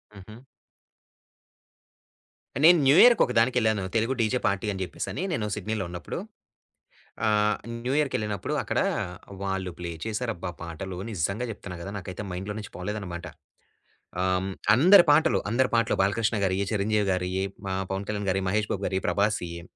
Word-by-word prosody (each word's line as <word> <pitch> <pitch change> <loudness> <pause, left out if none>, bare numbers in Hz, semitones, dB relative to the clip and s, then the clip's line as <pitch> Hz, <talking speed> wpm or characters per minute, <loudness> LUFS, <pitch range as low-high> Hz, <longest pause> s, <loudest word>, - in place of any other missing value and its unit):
హుహు. 110 +4 -12 2.2
నేను 175 +1 +8
న్యూ 135 - +6
ఇయర్‌కొక 235 - +6
దానికి 120 +3 +2
వెళ్ళాను. 110 -4 +2
తెలుగు 115 +3 +2
డీజే 115 +3 +1
పార్టీ 100 +2 -1
అని 95 -1 -5
చెప్పేసని 90 - -5
నేను 115 -10 -1
సిడ్నీలో 105 0 -3
ఉన్నప్పుడు, 85 0 -6 1.1
ఆహ్, 105 0 +3 0.3
న్యూ 130 - 0
ఇయర్‌కెళ్ళినప్పుడు 105 -9 -1
అక్కడ - - -2 0.6
వాళ్ళు 95 -1 -2
ప్లే 85 -1 -5
చేశారబ్బా! 110 -5 -3
పాటలు 90 +2 -6
నిజంగా 100 +5 -2
చెప్తున్నా 95 -4 -9
కదా! 100 - -6
నాకైతే 95 +2 -7
మైండ్‌లో 95 +4 -5
నుంచి 105 - -8
పోలేదన్నమాట. 90 -2 -5 1.0
ఆహ్, 95 +1 0 0.3
అందరి 180 +7 +8
పాటలు, 160 +2 +4
అందరి 125 +3 +2
పాటలు 115 0 +2
బాలకృష్ణ 105 +3 +1
గారియ్యి, 95 +1 0
చిరంజీవి 105 0 +1
గారియ్యి, 90 +1 -1 0.3
ఆహ్, 95 0 -1
పవన్ 95 +1 -3
కళ్యాణ్ 105 -2 -2
గారియ్యి, 95 0 0
మహేష్ 105 +1 0
బాబు 100 0 -4
గారియ్యి, 95 0 -2
ప్రభాసియ్యి 90 -5 -1
100 Hz, 140 wpm, -26 LUFS, 95-110 Hz, 2.2 s, నేను